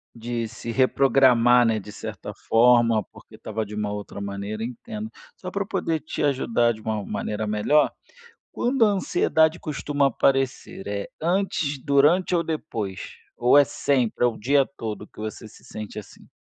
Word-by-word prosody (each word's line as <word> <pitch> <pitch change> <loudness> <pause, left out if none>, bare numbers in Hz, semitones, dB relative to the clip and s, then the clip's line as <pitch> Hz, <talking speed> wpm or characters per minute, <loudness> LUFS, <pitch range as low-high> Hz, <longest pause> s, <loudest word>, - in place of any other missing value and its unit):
De 115 0 -3
se 115 +1 -7
reprogramar, 125 -2 +4
né, 110 -1 +1
de 105 +1 -10
certa - - -7
forma, 115 -2 +3
porque - - -16
tava 110 +1 -4
de 105 - -8
uma 105 -1 -2
outra 105 -1 -6
maneira, 100 +2 -5
entendo. 215 - -6 0.3
Só 185 0 -7
pra 200 - -2
eu - - -16
poder 175 -6 -1
te 155 - -5
ajudar 120 -4 +2
de 110 - -12
uma 110 -2 -3
maneira 105 0 -3
melhor, 105 +9 +2 0.6
quando 245 -1 +2
a 210 - +3
ansiedade 160 -4 +2
costuma 145 -2 -1
aparecer, 135 -5 0
é 100 0 -4
antes, 165 -5 -1
durante 150 +6 +3
ou 170 - +1
depois? 115 - -4 0.4
Ou 125 +4 +5
é 145 - +7
sempre, 125 -2 0
é - - +5
o 115 - -6
dia 140 +5 +3
todo 110 -2 -5
que - - -24
você 110 0 -6
se - - -18
sente 105 0 -8
assim? 100 - -12
120 Hz, 170 wpm, -24 LUFS, 110-150 Hz, 0.6 s, é